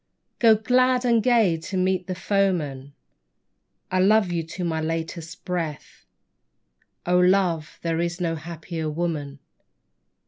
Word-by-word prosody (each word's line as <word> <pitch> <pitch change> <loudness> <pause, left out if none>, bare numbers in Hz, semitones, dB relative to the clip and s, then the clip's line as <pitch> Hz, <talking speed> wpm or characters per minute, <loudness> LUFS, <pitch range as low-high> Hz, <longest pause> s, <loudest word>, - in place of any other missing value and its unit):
Go 225 -2 +6
glad 255 +3 +2
and 235 -2 +3
gay 220 -8 +3
to 185 +4 -5
meet 185 -1 0
the 185 - -3
foeman, 170 -8 -1 1.0
I 185 - +1
love 200 0 +4
you 170 -1 0
to 165 +3 -7
my 160 -2 -1
latest 165 +1 -5
breath; 170 -5 -5 1.0
Oh, 180 0 +3
love, 180 -4 +2
there 165 -1 -1
is 170 +1 -2
no 170 -2 -1
happier 165 0 -5
woman. 150 -3 -3
175 Hz, 130 wpm, -24 LUFS, 160-195 Hz, 1.0 s, Go